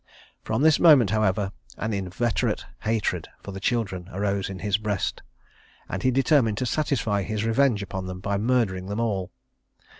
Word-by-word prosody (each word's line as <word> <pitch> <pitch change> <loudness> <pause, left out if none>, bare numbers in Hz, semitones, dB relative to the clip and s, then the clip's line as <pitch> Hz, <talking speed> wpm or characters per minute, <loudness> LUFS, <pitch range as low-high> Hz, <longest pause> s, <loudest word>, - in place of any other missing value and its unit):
From 140 - -1
this 160 -1 +5
moment, 140 - +6
however, 105 -2 +1 0.3
an 110 +1 -2
inveterate 100 +4 -1
hatred 110 -1 -1 0.2
for - - -7
the 95 - -6
children 95 -5 -1
arose 100 +1 -1
in 95 - -6
his 100 +3 0
breast, 105 -3 -2 0.7
and 95 - -4
he 130 - +3
determined 130 -4 +3
to 130 - -1
satisfy 120 -7 0
his 110 +2 -2
revenge 115 -2 +2
upon 95 -1 -5
them 90 0 -6
by 100 +1 -1
murdering 105 -6 +1
them 100 +2 -3
all. 100 -6 -1
105 Hz, 160 wpm, -25 LUFS, 95-115 Hz, 0.7 s, moment